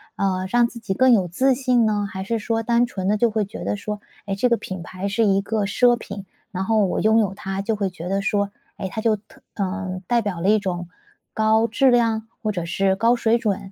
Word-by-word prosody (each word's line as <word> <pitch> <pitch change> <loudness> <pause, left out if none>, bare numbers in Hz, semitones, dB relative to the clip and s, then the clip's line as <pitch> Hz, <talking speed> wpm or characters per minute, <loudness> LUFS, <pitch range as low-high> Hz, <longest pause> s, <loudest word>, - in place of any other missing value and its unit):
呃， 185 -1 0
让 240 0 +4
自 235 - -10
己 210 -4 -3
更 260 +4 +4
有 190 -5 +3
自 260 +11 +2
信 250 -3 +2
呢？ 210 -1 +1
还 190 0 -5
是 230 +3 -1
说 225 +1 -1
单 235 +1 +3
纯 190 -6 -4
地 210 - +3
就 235 +1 +3
会 215 -1 0
觉 200 - -8
得 - - -1
说， 210 0 -5 0.2
诶， 195 -1 -2
这 245 +5 +2
个 235 - +3
品 185 -4 -6
牌 185 +3 -5
是 200 +3 +1
一 195 -1 +3
个 210 +1 -1
奢 240 +4 +4
品， 200 -4 -8 0.3
然 190 -2 -3
后 215 -1 +3
我 185 - -1
拥 220 +1 +4
有 200 -3 +1
它 195 0 -4
就 220 +2 -1
会 200 -2 -1
觉 180 -1 -7
得 195 +1 0
说 200 0 0 0.3
诶， 190 - -4
它 220 - -5
就 220 -1 +2
特 205 0 -18
呃， 190 -2 -3
代 240 -1 +2
表 195 -6 -4
了 190 - +2
一 215 - +5
种 175 -3 -4 0.4
高 220 +1 +3
质 265 +3 +3
量 225 -2 +2
或 215 - -1
者 175 -4 -3
是 190 +3 +1
高 230 +5 +3
水 235 -1 +2
准？ 200 -3 -2
210 Hz, 265 characters per minute, -22 LUFS, 195-230 Hz, 0.4 s, 一